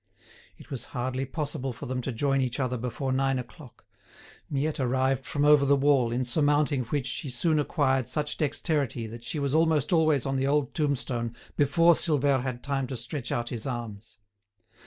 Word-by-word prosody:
It - - -16
was 135 - -4
hardly 130 +2 -1
possible 135 -3 -3
for 130 - -8
them 130 -1 -2
to 130 - -3
join 135 +3 +1
each 130 +1 -2
other 125 -2 0
before 125 +2 -3
nine 135 0 +1
o'clock. 120 -4 -10 0.6
Miette 145 +2 -1
arrived 130 +1 +1
from 145 0 0
over 150 -1 +6
the 140 +1 +4
wall, 135 -4 +3
in 125 +2 -1
surmounting 145 0 +2
which 140 +2 -2
she 135 +2 -3
soon 155 +6 +1
acquired 135 -4 +1
such 150 +3 -2
dexterity 145 -5 0
that 115 +1 -9
she 135 - -3
was 140 -1 -1
almost 160 -1 +2
always 155 -5 +3
on 135 0 -1
the 135 +1 0
old 145 -2 +1
tombstone 130 -6 -1 0.2
before 165 +4 +5
Silvère 145 -5 +1
had 125 -1 -4
time 135 -2 -1
to 130 -1 -5
stretch 125 +2 -5
out 120 0 -1
his 120 0 -4
arms. 115 -4 -6
135 Hz, 180 wpm, -27 LUFS, 125-145 Hz, 0.6 s, over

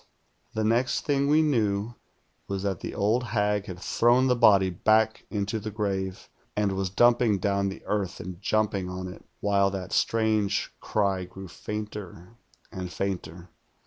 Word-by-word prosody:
The 110 - 0
next 115 +4 +1
thing 140 -2 +2
we 155 +2 +5
knew 110 -6 +1 0.5
was 100 -1 -3
tliMt 95 -3 -1
the - - -6
old 110 +5 +2
hag 105 -3 0
had 90 - -6
thrown 120 +6 +3
the 125 -1 +3
body 100 -6 +5
back 110 +4 +2
into 105 +1 -2
the 110 +1 -5
grave, 95 -3 -3 0.3
and 105 -1 +1
was 95 0 -1
dumping 120 +1 +4
down 100 +1 0
the 95 - -9
earth 100 -4 -2
and 90 0 -7
jumping 105 -3 0
on 90 0 -5
it, 90 - -10 0.2
wliile 100 -1 +3
that 95 -2 -5
strange 110 -3 +1
cry 100 -3 0
grew 95 +1 -10
fainter 105 -1 -7 0.4
and 90 -3 -6
fainter. 90 -2 -4
100 Hz, 155 wpm, -27 LUFS, 95-110 Hz, 0.5 s, we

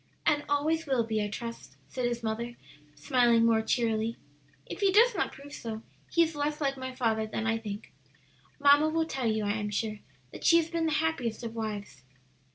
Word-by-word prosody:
"And 295 -1 +3
always 310 +3 +1
will 260 -4 +2
be, 220 -1 -1
I - - -1
trust," 230 +3 -7
said 250 -2 -2
his 240 -1 -3
mother, 235 +2 -3 0.4
smiling 240 -4 +3
more 225 -1 +4
cheerily. 225 0 0 0.5
"If - - -7
he 395 -2 +3
does 460 +5 +6
not 390 - -1
prove 285 +1 -12
so, 225 -1 -6 0.3
he 335 - +5
is 325 -1 -3
less 295 +1 -1
like 275 -2 0
my 260 -1 -5
father 220 -3 0
than 220 +1 -3
I 225 0 +1
think. 210 -1 -7 0.7
Mamma 290 +2 +6
will 325 +1 +1
tell 265 -6 -2
you, 215 -1 -1
I 205 - +1
am 210 -1 -2
sure, 210 +1 -2 0.3
that - - -10
she 335 - +6
has 330 0 0
been 335 -1 0
the 315 - 0
happiest 250 -9 -1
of 230 -1 -5
wives." 205 - -5
240 Hz, 200 wpm, -29 LUFS, 220-295 Hz, 0.7 s, does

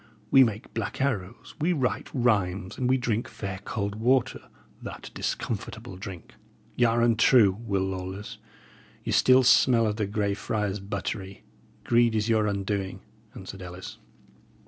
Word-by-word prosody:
We 135 - +8
make 110 -1 -3
black - - -4
arrows, 115 -6 -2
we 175 +4 +2
write 130 -6 -1
rhymes, 100 -7 0
and 125 -1 -1
we 130 - +4
drink 120 -2 -1
fair 95 -2 -6
cold 100 -1 -3
water, 120 +4 +1 0.4
that - - -8
discomfortable 110 -1 -4
drink." 95 -2 -9 0.4
"Y' 120 - +3
are 115 0 +2
untrue, 115 -2 +5 0.2
Will 100 -1 +1
Lawless. 95 +1 -5 0.6
Ye - - -3
still 130 0 +5
smell 120 -1 +5
of 105 -1 -1
the 105 -3 -1
Grey 100 0 0
Friars' 105 0 -2
buttery; 100 0 -5 0.4
greed 120 -1 +3
is 110 +1 0
your 110 -2 +3
undoing," 100 -1 -2 0.3
answered 95 0 -9
Ellis. 90 +1 -9
105 Hz, 145 wpm, -27 LUFS, 95-120 Hz, 0.6 s, We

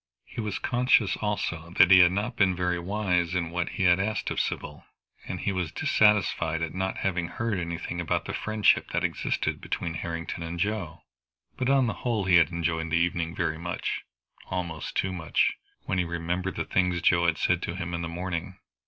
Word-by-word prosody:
He - - -6
was 105 -2 -3
conscious 120 -5 +2
also 90 -5 -3
that 90 - +7
he 95 - +9
had 90 -1 +7
not 100 +3 -2
been 95 -2 +3
very 90 0 0
wise 90 -2 0
in 85 -2 -1
what 90 0 -1
he - - 0
had 90 0 +5
asked 105 +1 -1
of - - -1
Sybil, 75 - -3 0.4
and 90 - -4
he 100 - 0
was 90 -4 -2
dissatisfied 85 -6 +2
at 80 - -3
not 95 +1 -2
having 90 -3 -1
heard 110 +2 -2
anything 85 0 -4
about 85 - -1
the - - -4
friendship 110 -1 +2
that - - 0
existed - - -1
between 85 - -3
Harrington 85 0 -4
and 85 +1 -5
Joe. 90 -5 -2 0.5
But 130 - -1
on 135 -2 +4
the 110 - -1
whole 115 -5 0
he 90 -2 +6
had 85 - +5
enjoyed 85 -1 -1
the 80 - +1
evening 85 -1 0
very 80 -2 -1
much 85 +1 -3 0.5
almost 85 -4 -4
too 95 -1 0
much, 80 -5 +1 0.3
when 95 - -1
he - - +3
remembered 85 +2 -3
the - - -2
things 90 -1 +1
Joe 85 -1 +4
had 80 -2 +2
said 90 +2 +1
to 85 - -4
him 85 -2 -4
in 85 - -2
the 85 - -3
morning. 90 +1 -4
90 Hz, 200 wpm, -27 LUFS, 85-95 Hz, 0.5 s, he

